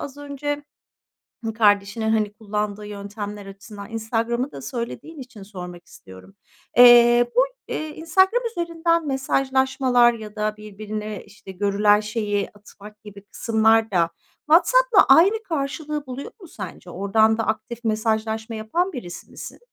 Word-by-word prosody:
az 280 -1 -7
önce 290 0 -4 0.9
kardeşinin, 210 0 +2
hani, 215 -2 0
kullandığı 210 -1 -4
yöntemler 205 0 -7
açısından 200 +2 -11
Instagram’ı 230 +3 -2
da - - -9
söylediğin 260 +6 -6
için 245 -5 -11
sormak 180 -3 -10
istiyorum. 95 - -15 0.4
Eee, 240 0 +7
bu, - - +6 0.3
eee, 310 - -3
Instagram 380 +8 +2
üzerinden 335 -3 -1
mesajlaşmalar 265 -2 +2
ya 215 -2 -10
da 215 0 -2
birbirine, 215 0 -7
işte, 200 -1 -13
görülen 205 +2 +2
şeyi 210 -2 -2
atmak 210 +1 -15
gibi 205 -1 -12
kısımlar 220 +1 +2
da 170 -3 +1 0.4
WhatsApp’la 485 +10 +5
aynı 405 +7 +5
karşılığı 300 -3 -4
buluyor 260 +2 -7
mu 360 - -12
sence? 185 - -9
Oradan 220 +4 +2
da 225 - -1
aktif 220 +2 -4
mesajlaşma 220 0 -1
yapan 340 +13 -1
birisi 175 - -8
misin? - - -10
220 Hz, 130 wpm, -22 LUFS, 210-270 Hz, 0.9 s, Eee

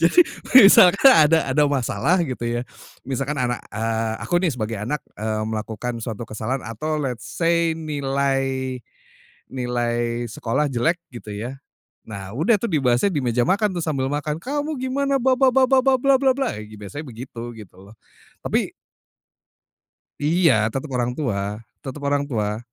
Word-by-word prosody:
Jadi 170 - +5 0.5
misalkan 200 +7 +7
ada 160 - +4
ada 150 +3 +3
masalah 145 +6 +1
gitu 130 -5 -5
ya, 120 +1 -1 0.4
misalkan 135 +3 -3
anak, 125 -1 -1
eee, 110 +1 -2
aku 175 - +1
nih 180 - +2
sebagai 110 -3 -3
anak, 145 +7 -3
eee, 110 0 -2
melakukan 110 +2 -4
suatu 115 0 -5
kesalahan 115 +6 -3
atau 135 +8 -3
let 130 -5 -2
say 165 +5 +1
nilai 135 -3 -1 0.7
nilai 120 -1 -1
sekolah 115 +6 -1
jelek 145 +8 +1 0.2
gitu 115 -3 -9
ya. 120 +6 -6 0.5
Nah 95 -2 -7
udah 165 - +2
tuh 235 - -2
dibahasnya 135 +4 +2
di 155 - 0
meja 120 -1 +1
makan 200 +1 +1
tuh 175 - -2
sambil 140 -5 -1
makan, 150 +1 -2
"Kamu 290 +5 -3
gimana 275 +2 0
ba 260 +1 +3
ba 265 0 +4
ba 260 +1 +4
ba 265 0 +5
ba 270 0 +4
bla 275 +1 +4
bla 270 -1 +4
bla!" 270 -2 0 0.2
biasanya 105 +6 -8
begitu, 120 -1 -8
gitu 105 -5 -13
loh, - - -15 0.5
tapi - - 0 1.5
Iya 165 +1 +4 0.2
tetep 135 +2 -4
orang 120 0 0
tua 125 -10 -1 0.4
tetep 135 +2 -7
orang 145 0 +1
tua. 105 -3 -1
135 Hz, 155 wpm, -22 LUFS, 120-165 Hz, 1.5 s, misalkan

